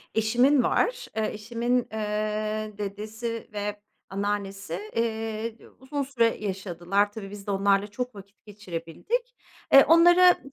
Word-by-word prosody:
Eşimin 245 +5 +4
var. - - +1
Eee, 215 -1 0
eşimin, 235 +3 -1
eee, 215 0 -2
dedesi 215 +3 -5
ve 205 0 -4 0.3
anneannesi, 195 -3 -3 0.2
eee, 225 0 -2
d - - -16
uzun 280 +2 -4
süre 235 -4 +1
yaşadılar. 195 +1 0
Tabii 205 -2 -8
biz 205 -1 -10
de - - 0
onlarla 200 +1 +2
çok 245 +3 -5
vakit 200 +3 -14
geçirebildik. 210 - -4 0.4
Eee, 275 - +10
onlara 350 +3 +7
215 Hz, 125 wpm, -26 LUFS, 200-240 Hz, 0.4 s, Eee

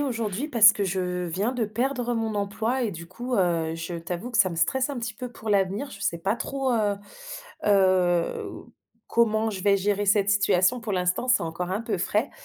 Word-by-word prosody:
aujourd'hui 230 -3 -2
parce 225 -7 +7
que 205 - -2
je 180 -1 -2
viens 190 +7 -1
de 245 -3 -1
perdre 245 +3 -1
mon 225 -2 -2
emploi 215 +5 -1
et 220 - -1
du 170 0 -8
coup, 240 +8 -5
heu, 170 -5 +1
je 165 +1 -5
t'avoue 175 +7 -5
que 230 - -1
ça 190 - +5
me 175 - -6
stresse 260 - +1
un 275 - -4
petit 230 -1 -4
peu 250 +3 -6
pour 220 -2 -9
l'avenir. 200 +7 0
Je 200 - -11
sais 170 -4 -1
pas 195 +6 -1
trop, 270 +3 -2
heu 210 -3 +1 0.7
heu, 185 -4 +2 0.6
comment 220 -1 +2
je 190 -3 -6
vais 200 0 +4
gérer 205 +1 0
cette 200 0 +3
situation 200 +3 +3
pour 220 -2 -4
l'instant, 180 +6 0
c'est 250 - +4
encore 170 +2 -4
un 195 +3 -1
peu 225 -4 -2
frais. 210 +7 0
205 Hz, 205 wpm, -25 LUFS, 185-235 Hz, 0.7 s, parce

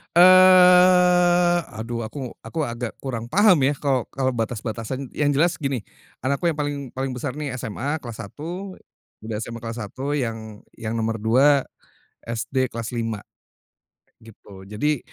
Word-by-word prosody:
Eee, 180 -1 +6 0.2
aduh 115 +2 -4
aku 130 0 -7
aku 165 - -7
agak 120 -2 -5
kurang 120 -3 -4
paham 195 - +5
ya 145 - 0
kalau 135 -4 +1
kalau 130 -1 0
batas-batasan 115 +2 -4
yang 150 - 0
jelas 165 +3 +2
gini, 135 -6 -2 0.4
anakku 140 +6 0
yang 165 - 0
paling 145 -2 -3
paling 135 0 -2
besar 125 +2 -4
nih 150 -3 -4
SMA 135 +7 -3
kelas 120 -5 -8
1, 175 - -8 0.4
udah 110 0 -6
SMA 115 0 -7
kelas 115 0 -6
1 135 +8 -4
yang 110 -5 -5 0.2
yang 110 +1 -4
nomor 115 0 -2
2, 135 +6 +3 0.6
SD 125 +3 -2
kelas 115 +1 -5
5, 115 -2 -2 1.0
gitu 100 -3 -15
jadi, 140 +7 -1
130 Hz, 145 wpm, -23 LUFS, 115-155 Hz, 1.0 s, Eee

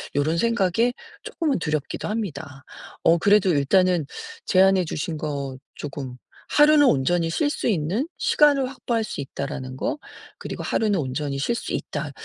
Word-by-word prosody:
요런 155 +4 +1
생각에 230 +2 +2 0.3
쪼끔은 305 - -1
두렵기도 150 -2 -3
합니다. 160 -10 -5 0.4
어 165 +1 +5
그래도 200 +1 +4
일단은 175 +3 +3 0.4
제안해 190 -1 +4
주신 155 0 -3
거 140 -3 -4 0.2
쪼금 135 -3 -6 0.3
"하루는 295 0 +6
온전히 165 - +2
쉴 290 - +1
수 - - -2
있는 195 - 0
시간을 285 -3 +3
확보할 235 -3 -2
수 145 - -5
있다."라는 130 -1 -6
거 300 - -2 0.4
그리고 - - -6
"하루는 210 -5 +1
온전히 140 +1 -3
쉴 235 +11 0
수 - - -5
있다." - - -4
175 Hz, 320 characters per minute, -24 LUFS, 145-230 Hz, 0.4 s, 하루는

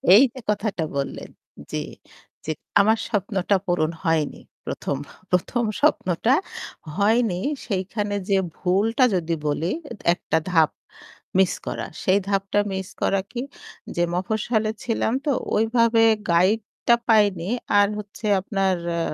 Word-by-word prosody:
এই 235 - +8
যে 260 - -9
কথাটা 205 -5 0
বললেন, 140 - -4 0.4
জি। - - -2 0.6
যে 160 - -1 0.3
আমার 220 +3 +4
স্বপ্নটা 200 -2 0
পূরণ 165 -3 +1
হয়নি। 160 -2 0 0.2
১ম, 140 - -3 0.3
১ম 185 +7 +1 0.2
স্বপ্নটা 185 +9 +2 0.6
হয়নি। 210 -2 +2 0.3
সেইখানে 205 +1 -2
যে 195 - +4 0.2
ভুলটা 210 +7 +2
যদি, 170 -2 -1
বলি 160 +4 0 0.4
একটা 170 - -1
ধাপ 160 -3 +5 0.7
মিস 190 -1 +4
করা। - - -3 0.2
সেই 190 +2 +4
ধাপটা 195 +1 +1
মিস 190 -1 -3
করা 195 -1 +2
কি? 240 - -3 0.5
যে 175 - +2
মফস্বলে 215 +3 0
ছিলাম 230 -1 0
তো 290 - +2 0.2
ওইভাবে 225 +1 +3 0.3
গাইড 185 +6 +4 0.3
টা 235 - +7
পাইনি। 200 -5 +3 0.3
আর 205 - +5
হচ্ছে 210 +1 -9 0.2
আপনার 195 -1 0 0.2
আ - - 0
200 Hz, 125 wpm, -23 LUFS, 180-220 Hz, 0.7 s, এই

